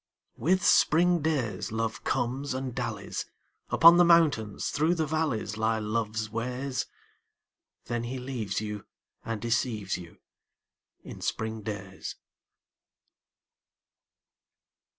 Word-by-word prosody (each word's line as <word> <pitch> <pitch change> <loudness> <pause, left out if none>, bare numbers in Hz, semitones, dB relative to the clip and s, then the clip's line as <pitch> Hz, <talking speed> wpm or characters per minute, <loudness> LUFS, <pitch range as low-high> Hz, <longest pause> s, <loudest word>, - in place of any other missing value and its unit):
With 180 +8 +2
spring 175 +2 +4
days 140 -11 -1
Love 110 0 -2
comes 130 +3 -1
and 130 -1 -3
dallies: 115 -5 -4 0.4
Upon 170 +1 +8
the 175 - +7
mountains, 155 - +3
through 155 +4 +2
the 160 -2 0
valleys 145 -9 -1
Lie 110 0 +1
Love's 110 0 -2
ways. 125 +4 -3 1.0
Then 120 0 -2
he 130 +2 -4
leaves 125 -6 -3
you 105 -1 -6 0.4
and 115 -1 -3
deceives 115 -4 -1
you 85 -1 -12 0.9
In - - -10
spring 110 0 -2
days. 100 -2 -6
120 Hz, 105 wpm, -28 LUFS, 110-145 Hz, 1.0 s, Upon